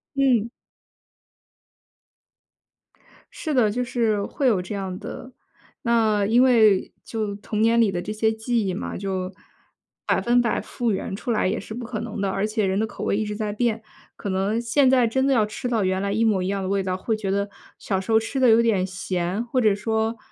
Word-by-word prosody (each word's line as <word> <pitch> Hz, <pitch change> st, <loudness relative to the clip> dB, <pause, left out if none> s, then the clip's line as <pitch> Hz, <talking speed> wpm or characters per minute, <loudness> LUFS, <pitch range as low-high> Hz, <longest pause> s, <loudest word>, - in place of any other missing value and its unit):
嗯。 250 Hz, -5 st, +2 dB, 2.8 s
是 310 Hz, -, -4 dB
的， 235 Hz, -6 st, +3 dB
就 245 Hz, +4 st, -2 dB
是 230 Hz, -4 st, 0 dB
会 280 Hz, -, -3 dB
有 200 Hz, -6 st, +3 dB
这 185 Hz, +3 st, -6 dB
样 190 Hz, -2 st, -4 dB
的。 255 Hz, -, -8 dB, 0.5 s
那 220 Hz, -3 st, +2 dB
因 235 Hz, +5 st, +4 dB
为 220 Hz, -6 st, +4 dB
就 215 Hz, -3 st, -3 dB
童 210 Hz, +1 st, -3 dB
年 230 Hz, +1 st, +4 dB
里 225 Hz, -, +4 dB
的 175 Hz, -1 st, -2 dB
这 210 Hz, -, -5 dB
些 220 Hz, +1 st, +1 dB
记 220 Hz, 0 st, -1 dB
忆 185 Hz, -, -1 dB
嘛， 190 Hz, -, -4 dB
就 190 Hz, -1 st, -3 dB, 0.7 s
100% 240 Hz, -1 st, +2 dB
复 240 Hz, -2 st, -2 dB
原 195 Hz, 0 st, -3 dB
出 235 Hz, -, -4 dB
来 215 Hz, -4 st, +1 dB
也 -, -, 0 dB
是 215 Hz, -, -8 dB
不 240 Hz, 0 st, -6 dB
可 225 Hz, -2 st, -4 dB
能 230 Hz, -2 st, -6 dB
的。 200 Hz, -, 0 dB
而 195 Hz, +1 st, -1 dB
且 215 Hz, -1 st, 0 dB
人 190 Hz, 0 st, 0 dB
的 220 Hz, -, +1 dB
口 215 Hz, -, -7 dB
味 -, -, +1 dB
一 215 Hz, -, -1 dB
直 210 Hz, -, -4 dB
在 210 Hz, -1 st, -3 dB
变， 225 Hz, 0 st, 0 dB, 0.4 s
可 -, -, -6 dB
能 195 Hz, +4 st, 0 dB
现 260 Hz, +4 st, +3 dB
在 255 Hz, -2 st, +4 dB
真 265 Hz, +4 st, +1 dB
的 275 Hz, -, +3 dB
要 220 Hz, -4 st, +3 dB
吃 230 Hz, +4 st, -5 dB
到 225 Hz, -4 st, +1 dB
原 185 Hz, 0 st, 0 dB
来 200 Hz, 0 st, -1 dB
一 225 Hz, +2 st, +1 dB
模 200 Hz, -4 st, +2 dB
一 185 Hz, -, -2 dB
样 200 Hz, 0 st, -1 dB
的 185 Hz, -, -3 dB
味 195 Hz, 0 st, 0 dB
道， 185 Hz, -1 st, -1 dB
会 220 Hz, +4 st, -1 dB
觉 205 Hz, -3 st, -3 dB
得 200 Hz, +1 st, 0 dB, 0.3 s
小 190 Hz, -2 st, -1 dB
时 195 Hz, -, -5 dB
候 220 Hz, -, +6 dB
吃 225 Hz, +5 st, -5 dB
得 255 Hz, -2 st, +5 dB
有 225 Hz, +1 st, +6 dB
点 205 Hz, -5 st, +2 dB
咸， 185 Hz, +1 st, -2 dB
或 250 Hz, +1 st, 0 dB
者 215 Hz, -3 st, +4 dB
说， 220 Hz, +2 st, -1 dB
215 Hz, 225 characters per minute, -24 LUFS, 195-235 Hz, 2.8 s, 候